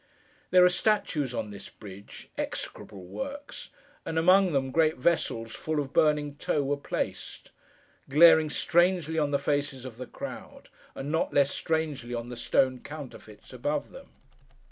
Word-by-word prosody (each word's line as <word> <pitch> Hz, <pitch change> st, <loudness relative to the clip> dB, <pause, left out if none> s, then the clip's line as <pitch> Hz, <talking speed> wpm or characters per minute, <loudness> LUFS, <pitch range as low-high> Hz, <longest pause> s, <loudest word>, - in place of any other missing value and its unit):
There 180 Hz, 0 st, +7 dB
are -, -, +6 dB
statues 180 Hz, -, 0 dB
on 105 Hz, -4 st, -4 dB
this 100 Hz, -, -9 dB
bridge 100 Hz, -1 st, -12 dB
(execrable 95 Hz, -2 st, -5 dB
works), 280 Hz, -, -7 dB, 0.3 s
and, 160 Hz, -, -4 dB
among 185 Hz, +3 st, +5 dB
them, 135 Hz, -2 st, 0 dB
great 160 Hz, +1 st, +2 dB
vessels 115 Hz, -6 st, 0 dB
full 155 Hz, -1 st, -2 dB
of 140 Hz, -2 st, -4 dB
burning 150 Hz, -2 st, +2 dB
tow 145 Hz, -1 st, 0 dB
were 140 Hz, +1 st, 0 dB
placed: 140 Hz, -, -5 dB, 0.6 s
glaring 160 Hz, +1 st, +7 dB
strangely 175 Hz, 0 st, +2 dB
on 150 Hz, -2 st, +1 dB
the 140 Hz, -, +2 dB
faces 140 Hz, -2 st, -2 dB
of 120 Hz, -3 st, -8 dB
the 130 Hz, 0 st, -7 dB
crowd, -, -, -9 dB, 0.3 s
and 140 Hz, +2 st, -5 dB
not 160 Hz, -, 0 dB
less 140 Hz, -1 st, +4 dB
strangely 150 Hz, -7 st, -2 dB
on 120 Hz, 0 st, -5 dB
the 125 Hz, -, -6 dB
stone 130 Hz, +2 st, +1 dB
counterfeits 130 Hz, -8 st, -11 dB
above 145 Hz, +4 st, -2 dB
them. -, -, -12 dB
145 Hz, 150 wpm, -28 LUFS, 130-160 Hz, 0.6 s, There